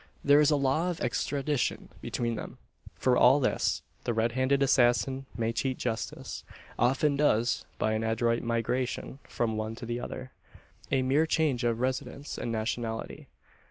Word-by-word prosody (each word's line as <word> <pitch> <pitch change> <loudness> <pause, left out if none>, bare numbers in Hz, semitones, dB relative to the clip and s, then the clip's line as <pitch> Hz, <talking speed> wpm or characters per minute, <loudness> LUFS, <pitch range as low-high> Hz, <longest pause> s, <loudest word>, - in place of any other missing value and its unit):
There 145 +1 +6
is 150 0 +5
a 150 - +4
law 140 +5 +1
of 175 - -3
extradition 140 -3 -1
between 120 -1 -2
them. 110 - -6 0.4
For 125 -1 +2
all 125 +4 +6
this 130 - 0 0.2
the 120 - -1
red 115 +1 +2
handed 130 +3 +2
assassin 130 +1 +2
may 115 -1 0
cheat 125 +3 -1
justice 115 -2 -4 0.4
often 135 +4 +3
does 120 -5 +2
by 110 - +1
an 110 0 -1
adroit 115 +1 +1
migration 120 +3 -2
from 110 -2 -2
one 110 +1 -3
to 120 - -8
the 120 +1 -3
other 130 +1 -6 0.6
a 135 -2 +2
mere 145 +5 +3
change 150 -7 +1
of 115 -1 +1
residence 130 +2 -3
and 120 - -3
nationality. 115 0 -3
125 Hz, 160 wpm, -29 LUFS, 115-140 Hz, 0.6 s, There